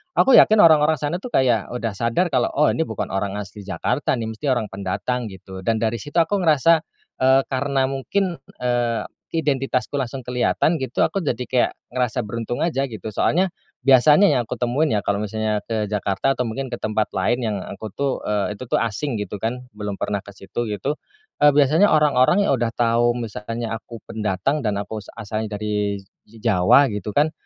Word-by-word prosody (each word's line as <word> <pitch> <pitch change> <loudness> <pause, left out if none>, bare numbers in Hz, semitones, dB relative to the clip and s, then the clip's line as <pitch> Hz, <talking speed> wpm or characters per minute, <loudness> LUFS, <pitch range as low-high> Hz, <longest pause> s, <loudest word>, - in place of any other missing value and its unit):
aku 270 - +5
yakin 215 0 +7
orang-orang 155 -2 +6
sana, 170 +5 -3
tuh, 250 - -6
kayak 120 -5 +2
udah 120 -2 -2
sadar 115 - +1
kalau, 130 -7 +1
oh, 150 +2 +3
ini 160 - +1
bukan 110 -9 -4
orang 95 +1 -2
asli 105 0 -8
Jakarta, 125 +9 -1
nih, 115 - -3
mesti 145 - -5
orang 120 -4 0
pendatang, 100 +5 -3
gitu. 95 0 -10
Dan 115 +4 +1
dari 110 +1 0
situ 145 0 -10
aku 165 +5 +2
ngerasa, 160 +1 +4 0.4
eee, 130 +1 +5
karena 135 0 0
mungkin, 170 +7 -1 0.3
eee, 120 -2 0 0.3
identitasku 135 -5 -1
langsung 135 -1 -2
kelihatan, 125 +6 +1
gitu, 135 -5 -4
aku 195 -3 +1
jadi 145 - -1
kayak 125 -2 +2 0.2
ngerasa 125 -1 0
beruntung 115 +2 -4
aja, 155 -5 0
gitu. 110 0 -7
Soalnya 175 - +1 0.4
biasanya 150 +9 +6
yang 130 -5 +2
aku 110 - -6
temuin, 130 +6 +1
ya, 105 - +2
kalau 100 +1 -1
misalnya 110 0 -2
ke 110 -2 -2
Jakarta 105 +5 0
atau 125 - -1
mungkin 125 +3 -4
ke 125 - -4
tempat 110 -2 -1
lain 110 +6 +1
yang 110 -4 -1
aku, 110 +2 -7
tuh, 140 -1 0 0.2
eee, 105 0 -1
itu, 130 - -7
tuh, - - 0
asing, 115 +4 -2
gitu, 105 -1 -5
kan, 120 +4 -3
belum 105 -1 -5
pernah 100 +1 -2
ke 100 0 -13
situ, 100 +5 -4
gitu, 110 +9 -3 0.4
eee, 145 0 +6
biasanya 150 +8 +5
orang-orang 150 +4 +4
yang - - +1
udah 115 -1 -1
tau 120 0 +2
misalnya 115 0 -4
aku 115 0 -12
pendatang 110 +7 -1
dan 105 -6 -1
aku 105 +2 -4
as 100 - -13
asalnya 110 -1 -4
dari 105 -1 -2 0.2
Jawa, 110 +3 +3
gitu, 105 0 -5
kan, 150 +2 +3
120 Hz, 190 wpm, -22 LUFS, 105-140 Hz, 0.4 s, yakin